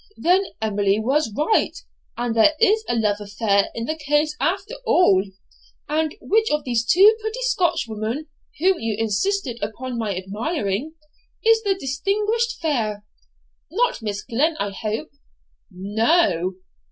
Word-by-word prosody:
'Then 365 +4 +3 0.2
Emily 205 -2 +1
was 265 +3 +1
right, 305 +9 +1 0.4
and 240 -1 -2
there 230 +7 +5
is 440 0 +4
a - - +1
love 210 -3 +1
affair 205 -1 +1
in 230 - -3
the 315 - -1
case 295 0 0
after 385 - -1
all? 355 - +4 0.6
And 310 0 -1
which 440 +2 +1
of 300 0 0
these 240 -3 0
two 390 - +6
pretty 440 +3 -4
Scotchwomen, 280 - -1 0.3
whom 365 +4 +2
you 225 -2 -2
insisted 240 - -1
upon 235 +4 -4
my 205 -5 -2
admiring, 210 - -3 0.5
is 450 0 +5
the 400 -3 +1
distinguished 415 - -1
fair? 220 -10 -1 0.6
not 470 - 0
Miss 205 -2 -4
Glen 310 +7 0
I 200 -6 -2
hope.' 215 -3 -4 0.6
'No.' 200 - +1
270 Hz, 135 wpm, -22 LUFS, -, 0.6 s, two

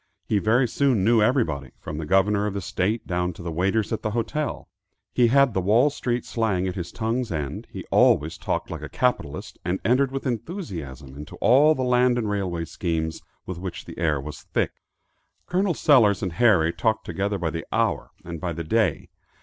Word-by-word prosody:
He 105 - +1
very 120 +5 +3
soon 125 -4 +1
knew 115 +1 +4
everybody, 95 - +1
from 75 0 -6
the 80 - -5
governor 100 +3 +3
of 100 - -4
the - - -1
state 95 +6 -1
down 90 0 -1
to 85 - -11
the 85 - -4
waiters 95 +7 0
at 110 - -2
the 110 - -1
hotel. 150 +6 -2 0.5
He 120 - +4
had 140 0 +4
the 95 - 0
Wall 115 +10 +4
street 125 -3 -2
slang 100 -5 0
at 90 - -2
his 85 -2 -5
tongue's 115 +1 -2
end; 75 -5 -4
he - - -8
always 80 +3 +3
talked - - -2
like - - -5
a - - -7
capitalist, 125 - -2
and 90 +2 -1
entered 130 +3 +3
with 135 +1 -4
enthusiasm 90 - -5
into 75 +1 -9
all 145 +6 +5
the 130 - -2
land 125 0 +3
and 110 -4 -1
railway 90 -5 -2
schemes 80 0 -3 0.2
with 95 -2 -6
which 95 -1 -6
the - - -10
air 80 -4 +1
was 75 +2 -8
thick. - - -1 0.7
Col. 185 +1 +1
Sellers 110 - +4
and 90 -3 -2
Harry 95 -8 +4
talked 110 -1 0
together 100 +4 -2
by 85 -3 -2
the 80 +1 -5
hour - - 0 0.2
and 85 -2 -6
by 85 -2 -2
the 85 +1 -5
day. 110 +7 0
100 Hz, 200 wpm, -24 LUFS, 85-120 Hz, 0.7 s, all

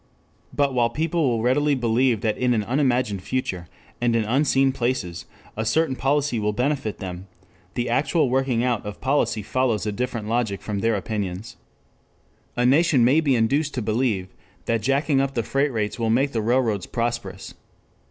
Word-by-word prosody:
But 140 -2 +1
while 120 -2 +2
people 160 +2 0
will 115 -2 -1
readily 145 +4 +2
believe 120 -2 +1
that 110 -2 0
in 125 -1 +1
an 110 - 0
unimagined 125 -5 0
future 95 -7 -3 0.3
and 120 -1 +2
in 115 - +2
unseen 135 +2 +2
places 120 -9 -3 0.3
a 110 - -2
certain 135 +5 +1
policy 135 -2 0
will 105 0 0
benefit 125 -2 -1
them, 90 0 -7 0.5
the 120 0 -1
actual 140 +5 +1
working 130 -2 +1
out 125 -3 0
of 105 0 -7
policy 130 -5 0
follows 120 -2 0
a 105 - -1
different 115 -1 -3
logic 110 -3 -1
from 105 -2 -3
their 115 +1 +1
opinions. 100 0 -4 1.0
A 120 - +2
nation 140 -1 +4
may 140 +6 +4
be 140 -4 +2
induced 140 +6 +1
to 125 - -1
believe 110 -4 0 0.4
that 115 -1 0
jacking 135 +2 +2
up 135 0 -2
the 115 - 0
freight 140 +5 0
rates 110 -1 -2
will 115 -1 0
make 135 +5 +2
the 115 - -1
railroads 115 -4 +1
prosperous. 120 0 -4
120 Hz, 170 wpm, -23 LUFS, 110-135 Hz, 1.0 s, nation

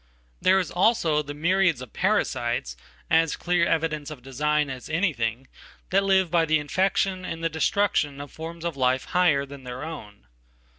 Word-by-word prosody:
There, 190 +1 +5
is 185 -3 -1
also 175 -6 +2
the 145 0 -7
myriads 175 -1 +2
of 125 -2 -10
parasites, - - 0 0.4
as 160 -1 +3
clear 175 -1 +1
evidence 155 -3 -1
ofdesign 150 +2 -1
as 130 +2 -8
an 155 - -1
anything, 135 - -1 0.4
that 195 +1 +3
live 190 -3 +2
by 170 -2 +3
the 155 0 +3
infection 185 +4 0
and 165 -2 -5
thedestruction 160 -3 +1
of 145 0 -8
forms 165 +1 -8
of 170 -3 -2
life 130 -1 +1
"higher" 160 -6 +3
than 140 -1 -11
their 125 +2 -7
own. 105 - -9
155 Hz, 160 wpm, -25 LUFS, 140-175 Hz, 0.4 s, There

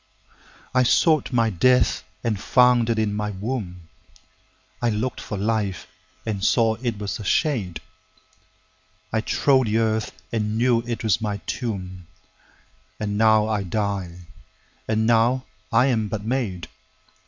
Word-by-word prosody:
13I 130 -1 +3
sought 155 +1 +3
my 115 -3 +2
death 125 +7 +3 0.2
and 110 -4 -1
found 125 0 +4
it 115 - +1
in 110 -2 0
my 105 0 -2 1.5
womb,14I 115 -3 +1
lookt 130 +3 -3
for 105 - -5
life 100 -3 -1 0.4
and 105 -3 -3
saw 115 0 +3
it 120 -4 -2
was 100 0 -4
a - - -6
shade,15I 95 - -5
trode 130 -4 +3
the 110 +1 +1
earth 110 -1 0 0.2
and 105 -1 -1
knew 120 0 +3
it 115 -1 -3
was 110 +1 +1
my 105 -2 -2
tomb,16And 95 -1 -8
now 110 0 +4
I 110 -2 0
die, 95 -3 -3 0.6
and 110 0 +1
now 120 +3 +3 0.3
I 115 +3 +4
am 115 -5 +1
but 105 -1 -5
made. 110 -9 -2
110 Hz, 130 wpm, -23 LUFS, 95-115 Hz, 1.5 s, found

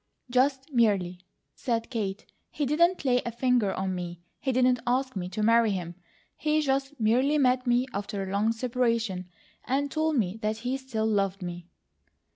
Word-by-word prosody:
"Just 270 +3 +1
'merely,'" 195 -7 +2 0.3
said 230 -2 -2
Kate. 205 -4 -3 0.2
"He 295 - -2
didn't 340 +4 +2
lay 250 -1 +3
a 235 - -3
finger 240 -3 +2
on 190 0 -2
me; 175 -1 -5 0.2
he 265 - -1
didn't 250 0 +3
ask 260 +1 0
me 180 -2 -3
to 215 +3 -3
marry 230 0 +5
him; 175 -2 -4 0.4
he 305 0 +1
just 275 -1 -1
merely 250 +7 +3
met 255 -2 +2
me 245 +1 +3
after 200 0 -3
a 190 - -5
long 205 +3 +2
separation, 230 -6 -1 0.3
and 275 +2 -1
told 315 0 +1
me 200 -3 0
that 215 0 -1
he 255 +2 0
still 250 -5 -3
loved 195 -3 0
me." 175 -1 -6
235 Hz, 170 wpm, -27 LUFS, 200-265 Hz, 0.4 s, marry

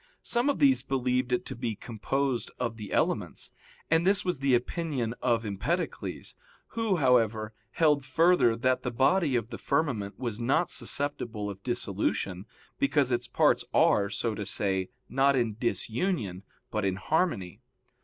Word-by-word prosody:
Some 240 +3 +1
of 285 - +1
these 275 -2 +4
believed 125 -1 -1
it 125 - 0
to - - -6
be 115 -2 -3
composed 125 +4 -2
of 120 -2 -2
the 105 -3 -8
elements; - - -1 0.4
and 165 0 +4
this 195 +2 +2
was 180 -6 -1
the 135 -2 +3
opinion 125 -2 -2
of 115 -2 +1
Empedocles, 140 - -3 0.4
who, 225 -4 0
however, 115 -6 +2 0.2
held 150 -4 +3
further 145 -2 +3
that 130 +2 +1
the 125 - -2
body 135 +4 +2
of 115 0 -1
the 115 - -6
firmament 110 -11 -1
was 115 -3 -4
not 135 +8 +1
susceptible 120 -7 -1
of 100 0 -11
dissolution, 100 -4 -2 0.3
because 145 - +2
its 120 - 0
parts - - +3
are, 100 0 +4
so 115 +2 -2
to 105 - -4
say, 95 -2 -1 0.2
not 135 +2 +3
in 115 -4 0
disunion, 115 - -1 0.3
but 105 -1 -1
in 95 -1 0
harmony. 100 - -1
125 Hz, 155 wpm, -28 LUFS, 110-145 Hz, 0.4 s, these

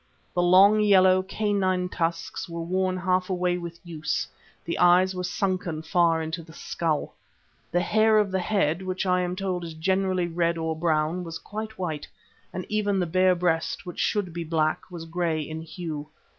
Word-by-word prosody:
The 175 - +1
long, 190 +4 +6
yellow, 190 -3 +5
canine 190 -2 0
tusks 170 +1 -3
were 170 0 -4
worn 185 +2 0
half 185 +1 0
away 180 -1 0
with 170 -1 -8
use; 160 -3 -2 0.4
the 170 - -3
eyes 180 +2 +5
were 180 0 -4
sunken 180 -4 -2
far 165 -1 +2
into 160 +2 -4
the 160 0 -14
skull; 160 -2 -2 0.6
the 175 - +2
hair 220 +3 +3
of 210 -2 +2
the 190 - 0
head, 180 -4 +1
which 185 0 -3
I 180 -1 +2
am 180 0 -2
told 185 -2 -2
is 165 -1 -7
generally 185 +2 +1
red 170 0 0
or 160 -1 -2
brown, 160 +1 0
was 165 -1 -6
quite 220 +1 -7
white, 160 -5 -4 0.4
and 185 - -5
even 205 -2 0
the 180 - +1
bare 185 +2 +3
breast, 170 +1 -1
which 175 - -7
should 200 -5 0
be 170 0 -3
black, 155 -1 0
was 170 -2 -7
grey 165 -1 -1
in 155 +1 -6
hue. 160 -2 -6
180 Hz, 180 wpm, -26 LUFS, 165-185 Hz, 0.6 s, long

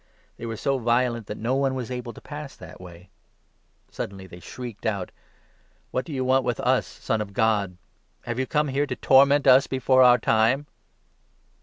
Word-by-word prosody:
They 115 - -7
were 115 -1 -5
so 135 +3 -1
violent 120 -1 0
that 105 - -6
no 115 +4 -1
one 135 -1 0
was 130 -1 -5
able 125 -1 -5
to - - -13
pass 145 -2 -8
that - - -13
way. 90 0 -13 0.8
Suddenly 95 -1 -6
29 95 - -13
they 85 - -10
shrieked 120 +2 -9
out: 100 -4 -3 0.4
" - - -38
What 130 - -2
do 165 - -9
you 130 -2 -2
want 130 +1 +3
with 120 -2 -2
us, - - +1
Son 110 - -3
of 100 -2 -6
God? 105 -5 0 0.5
Have 120 +1 -4
you 130 - -1
come 150 -1 0
here 140 +2 0
to 125 - -3
torment 140 +2 +4
us 130 +1 +6
before 130 0 +2
our 125 -1 +7
time 115 +5 +2
125 Hz, 195 wpm, -24 LUFS, 110-135 Hz, 0.8 s, our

